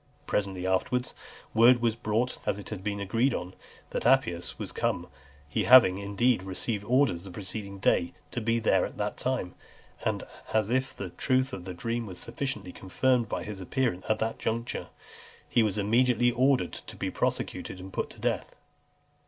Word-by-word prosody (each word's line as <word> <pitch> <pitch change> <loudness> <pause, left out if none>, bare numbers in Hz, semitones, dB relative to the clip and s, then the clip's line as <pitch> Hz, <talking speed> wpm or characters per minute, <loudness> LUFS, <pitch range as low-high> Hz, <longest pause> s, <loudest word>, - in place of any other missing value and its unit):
Presently 95 -3 -1
afterwards, 125 +7 0 0.4
word 120 +2 +7
was 115 -2 +1
brought, 115 +2 -1
as - - +1
it 100 - -8
had 100 -4 -6
been 100 -1 -2
agreed 115 +7 +1
on, 90 +1 -5 0.4
that - - -2
Appius 120 -10 +2
was - - -5
come, - - -1 0.4
he 75 - -1
having, 120 -7 +8
indeed, 100 +3 +2
received 100 +3 -3
orders 125 -7 +2
the 100 - -8
preceding 100 +1 -6
day 85 -2 +2 0.2
to 120 - -2
be 115 +1 +1
there 115 - +3
at - - -5
that - - -2
time; - - -2 0.5
and, - - -1 0.3
as 110 0 +2
if 130 +1 0
the 95 -3 -5
truth 130 +5 +1
of 90 -5 -6
the 90 -1 -6
dream 115 +4 -2
was 90 -2 -7
sufficiently 135 -2 -3
confirmed 120 +5 +1
by - - -2
his 100 -2 -6
appearance 110 -1 -1
at 110 - +3
that 110 +1 -2
juncture, 115 +2 -2 0.6
he 120 - +3
was 105 -2 +1
immediately 120 +3 +3
ordered 130 +2 +2
to - - -9
be - - -3
prosecuted 95 - -2
and 95 +1 -9
put - - -2
to - - -13
death. - - -2
110 Hz, 175 wpm, -28 LUFS, 95-125 Hz, 0.6 s, having